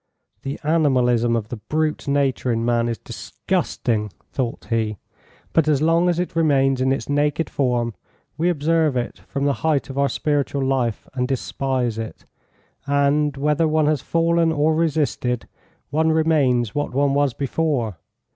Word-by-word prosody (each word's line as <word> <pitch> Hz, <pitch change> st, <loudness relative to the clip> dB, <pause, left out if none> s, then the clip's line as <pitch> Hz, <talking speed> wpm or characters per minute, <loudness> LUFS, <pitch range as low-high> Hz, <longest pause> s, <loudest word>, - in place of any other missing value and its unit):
"The 135 Hz, 0 st, -5 dB
animalism 125 Hz, -7 st, +2 dB
of 110 Hz, -2 st, -3 dB
the 120 Hz, -, -5 dB
brute 155 Hz, +8 st, -2 dB
nature 140 Hz, -3 st, +1 dB
in 115 Hz, 0 st, 0 dB
man 120 Hz, 0 st, +1 dB
is 115 Hz, -, -2 dB
disgusting," 105 Hz, +2 st, -2 dB, 0.2 s
thought 125 Hz, -4 st, -3 dB
he, 110 Hz, -2 st, 0 dB, 0.6 s
"but 160 Hz, -2 st, +3 dB
as 150 Hz, -3 st, +3 dB
long 165 Hz, +3 st, +3 dB
as 175 Hz, -, +1 dB
it 180 Hz, -1 st, -2 dB
remains 135 Hz, -5 st, +2 dB
in 130 Hz, +1 st, +2 dB
its 135 Hz, -, -2 dB
naked 145 Hz, +2 st, 0 dB
form 120 Hz, -4 st, 0 dB, 0.4 s
we 165 Hz, +4 st, +1 dB
observe 160 Hz, -3 st, +1 dB
it 120 Hz, -, -3 dB
from 140 Hz, -1 st, -2 dB
the 140 Hz, -, +3 dB
height 150 Hz, -4 st, 0 dB
of 135 Hz, -, -4 dB
our 140 Hz, 0 st, +3 dB
spiritual 140 Hz, -2 st, -1 dB
life 130 Hz, -4 st, -1 dB
and 125 Hz, -1 st, -1 dB
despise 130 Hz, -3 st, -1 dB
it; 110 Hz, -1 st, -7 dB, 0.6 s
and 140 Hz, +1 st, +2 dB
whether 150 Hz, +3 st, +2 dB
one 155 Hz, 0 st, +2 dB
has 150 Hz, -3 st, +1 dB
fallen 165 Hz, 0 st, +2 dB
or 155 Hz, 0 st, +2 dB
resisted 145 Hz, -7 st, 0 dB, 0.4 s
one 160 Hz, +2 st, +2 dB
remains 145 Hz, -8 st, +2 dB
what 145 Hz, -3 st, -2 dB
one 140 Hz, 0 st, +2 dB
was 140 Hz, -3 st, +1 dB
before. 135 Hz, -, -1 dB
140 Hz, 155 wpm, -22 LUFS, 125-155 Hz, 0.6 s, but